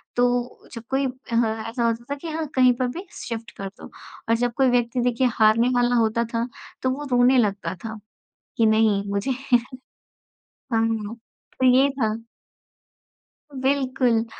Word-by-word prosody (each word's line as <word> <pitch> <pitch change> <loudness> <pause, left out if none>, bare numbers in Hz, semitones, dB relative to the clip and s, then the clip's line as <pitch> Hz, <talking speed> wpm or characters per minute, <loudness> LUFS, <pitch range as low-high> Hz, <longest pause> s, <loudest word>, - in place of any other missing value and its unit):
तो 245 0 0
जब 230 - -7
कोई 270 +1 +1
अ, 235 -4 -1
ऐसा 235 +1 -2
होता 230 0 0
था 285 - 0
कि 310 +4 -9
हाँ 315 0 -3
कहीं 255 -1 +5
पर 255 - +1
भी 340 +10 -6
शिफ़्ट 230 0 -6
कर 195 - -4
दो। 195 - -11 0.4
और 230 - +5
जब 240 0 0
कोई 265 -2 +4
व्यक्ति 245 0 +1
देखिए 245 +1 +2
हारने 225 +2 +4
वाला 245 0 +3
होता 230 0 +2
था, 230 +1 0 0.3
तो 260 - +1
वो 280 +3 -3
रोने 250 +1 +5
लगता 195 -6 0
था, 220 0 -5 0.6
कि 225 - +4
नहीं 215 -2 +3
मुझे 200 +7 -1 1.2
हाँ, 225 -3 -2 0.4
तो 260 - +1
ये 270 +2 +5
था। 225 -6 -1 1.5
बिल्कुल। 260 -4 +1
240 Hz, 155 wpm, -23 LUFS, 225-255 Hz, 1.5 s, कहीं